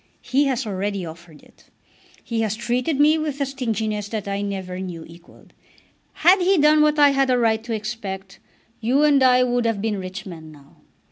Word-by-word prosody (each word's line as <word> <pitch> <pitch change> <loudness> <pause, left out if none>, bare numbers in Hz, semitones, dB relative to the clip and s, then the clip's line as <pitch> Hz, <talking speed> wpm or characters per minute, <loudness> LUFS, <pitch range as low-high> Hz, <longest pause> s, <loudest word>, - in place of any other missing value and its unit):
He 280 +3 +1
has 265 -2 -1
already 200 -2 -3
offered 165 -1 -12
it. - - -23 0.6
He 230 -1 -2
has 220 -1 -1
treated 250 +6 -1
me 305 +2 +4
with 300 -2 -3
a 280 - +1
stinginess 220 -6 -3
that 215 -2 -4
I 200 0 -2
never 190 -2 -5
knew 175 -4 -7
equalled. 170 +1 -18 0.6
Had 365 +4 +4
he 380 +2 +3
done 300 0 +5
what 300 0 +3
I 290 -1 +6
had 270 -1 +1
a 250 - +3
right 225 -2 +1
to 235 -1 -3
expect, 205 -3 -6 0.4
you 255 +6 +2
and 290 -2 +4
I 255 -1 +5
would 245 -1 0
have 225 -3 -1
been 210 -1 -2
rich 190 +2 -7
men 160 -4 -10
now. 140 -2 -19
225 Hz, 195 wpm, -22 LUFS, 195-270 Hz, 0.6 s, I